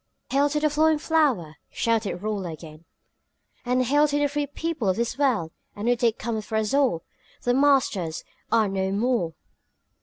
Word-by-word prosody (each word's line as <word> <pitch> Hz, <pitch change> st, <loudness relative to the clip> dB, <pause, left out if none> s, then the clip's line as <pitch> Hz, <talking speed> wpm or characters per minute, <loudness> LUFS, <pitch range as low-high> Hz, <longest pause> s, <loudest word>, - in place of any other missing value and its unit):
"Hail 280 Hz, +2 st, +3 dB
to 300 Hz, +1 st, 0 dB
the 305 Hz, 0 st, +1 dB
flowing 310 Hz, +1 st, +3 dB
flower!" 270 Hz, -, +1 dB
shouted 220 Hz, -5 st, -1 dB
Rolla 200 Hz, -5 st, -2 dB
again. 155 Hz, 0 st, -11 dB, 0.8 s
"And 250 Hz, +1 st, +1 dB
hail 290 Hz, +4 st, +4 dB
to 290 Hz, 0 st, 0 dB
the 290 Hz, -, +2 dB
free 290 Hz, 0 st, -2 dB
people 300 Hz, -6 st, -2 dB
of 185 Hz, -, +2 dB
this 235 Hz, +1 st, -1 dB
world! 250 Hz, -, +1 dB, 0.2 s
A 205 Hz, -, -7 dB
new 245 Hz, +2 st, +3 dB
day 235 Hz, -1 st, +2 dB
cometh 220 Hz, -1 st, -4 dB
for 220 Hz, -, -5 dB
us 220 Hz, +1 st, 0 dB
all! 265 Hz, -, +2 dB, 0.4 s
The 245 Hz, -, +2 dB
masters 255 Hz, -, +2 dB, 0.3 s
are 225 Hz, -2 st, +4 dB
no 190 Hz, 0 st, -1 dB
more!" 205 Hz, -6 st, 0 dB
235 Hz, 175 wpm, -25 LUFS, 195-285 Hz, 0.8 s, hail